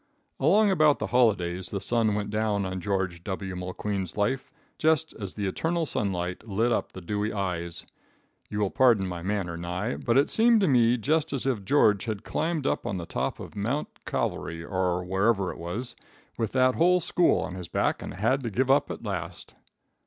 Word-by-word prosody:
"Along 200 +8 +4
about 155 -5 +4
the - - -2
holidays 95 -7 +2
the 100 - -3
sun 110 +1 +1
went 105 -1 -3
down 105 -2 0
on 95 0 -4
George 95 -3 -2
W. 95 -1 -4
Mulqueen's 90 +1 -4
life, 115 +6 0 0.3
just 160 0 +2
as 100 -3 -6
the 105 - -2
eternal 165 - -1
sunlight 90 - -2
lit 110 +4 +1
up - - 0
the 95 - -8
dewy 105 +4 -2
eyes. 85 -4 -3 0.6
You 105 0 -2
will 100 - +1
pardon 120 -7 +4
my 90 -2 -5
manner, 95 -2 -2
Nye, 90 +7 -3
but 120 +1 +1
it 140 - +3
seemed 230 0 +5
to 195 - +3
me 120 -3 +4
just 150 +6 0
as 135 - -1
if 125 -7 0
George 105 -2 +3
had 110 -4 -4
climbed 160 -2 -1
up - - +1
to 120 - -4
the 85 - -5
top 65 -4 -3
of - - -9
Mount 120 +9 -1 0.2
Cavalry, 80 0 -2
or 90 -1 0
wherever 95 +1 +1
it - - -10
was, 105 +9 -4 0.4
with 115 -2 -2
that 130 0 +4
whole 180 +4 +4
school 175 +1 +2
on 90 - -4
his 90 -2 -7
back, - - 0
and - - -6
had 115 +8 +1
to 120 - -3
give 130 +5 +1
up 145 +1 +3
at - - -6
last. 90 -5 -5
105 Hz, 195 wpm, -27 LUFS, 95-130 Hz, 0.6 s, seemed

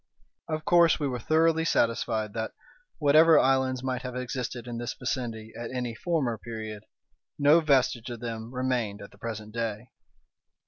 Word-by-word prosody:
Of 155 -1 -3
course 170 -1 +5
we 145 - 0
were 125 -2 -3
thoroughly 160 +5 +3
satisfied 115 -6 0
that, 110 -1 -3 0.4
whatever 155 +2 +6
islands 130 -1 +2
might 130 -1 -2
have 125 -1 -6
existed 125 -1 -4
in 120 -1 -5
this 120 - -4
vicinity 115 -3 -4
at 120 0 -5
any 125 -2 -3
former 130 - -1
period, 110 -2 -7 0.5
no 145 +3 +6
vestige 130 -5 +2
of 120 -1 -6
them 115 -1 -5
remained 125 -5 -1
at 100 - -12
the 100 - -20
present 110 -2 -6
day. 115 0 -4
125 Hz, 155 wpm, -28 LUFS, 115-135 Hz, 0.5 s, whatever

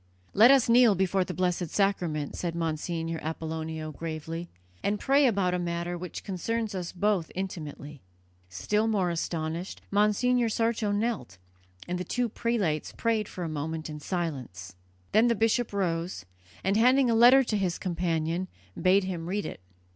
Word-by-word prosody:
"Let 225 +5 +7
us 270 -2 +6
kneel 235 -3 +6
before 190 0 +1
the - - -6
Blessed 180 -2 0
Sacrament," 175 -7 0
said 170 -2 -3
Monsignor 165 0 -2
Apollonio 160 0 -4
gravely, 165 +2 -5 0.3
"and 205 - 0
pray 275 +1 +4
about 195 -6 +1
a 180 - 0
matter 170 0 -2
which 175 0 -7
concerns 220 +3 -2
us 180 -3 -4
both 185 -2 0
intimately." 150 -6 -6 0.5
Still 210 - 0
more 195 -5 +1
astonished, 165 +1 -3
Monsignor 225 +4 +3
Sarto 225 -1 0
knelt, 205 - -2 0.5
and 180 0 -2
the - - -2
two 245 +6 -1
prelates 205 -10 -1
prayed 225 -2 0
for 180 - -6
a - - -2
moment 155 +1 -4
in 150 - -7
silence. 135 - -4 0.4
Then 220 +3 +5
the 235 - +3
bishop 225 +2 +1
rose, 175 - -2 0.4
and, 195 +3 +2
handing 250 +2 +4
a - - +3
letter 245 +4 +7
to 230 - -2
his 185 -4 0
companion, 170 0 -1 0.3
bade 190 +2 +4
him 175 -3 -4
read 205 +2 -1
it. - - -6
180 Hz, 155 wpm, -28 LUFS, 165-215 Hz, 0.5 s, Let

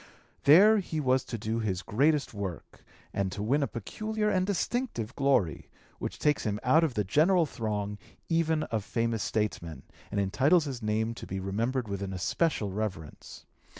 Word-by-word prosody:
There 200 +9 +7
he 165 -4 -3
was 130 -2 +2
to 115 - -5
do 110 +1 -2
his 100 -4 -2
greatest 145 +6 +1
work 95 -5 -6 0.3
and 100 -1 -1
to 100 +3 -4
win 135 +7 +2
a 140 - +1
peculiar 215 - -2
and 185 0 +1
distinctive 205 - -2
glory 135 - +1 0.3
which - - -4
takes 150 -1 +1
him 105 -1 -1
out 155 +6 +4
of 150 -6 0
the 105 - +1
general 160 - +3
throng 105 -5 -3 0.3
even 160 -2 +1
of 110 -2 0
famous 115 0 -1
statesmen, 85 -11 -2 0.3
and 100 - -2
entitles 135 - +3
his 130 -4 -5
name 110 +1 0
to 115 - -9
be 95 - -4
remembered 115 +6 -1
with 100 -1 -4
an 95 -1 -4
especial 105 - 0
reverence. 95 -7 -6
115 Hz, 170 wpm, -29 LUFS, 100-155 Hz, 0.3 s, There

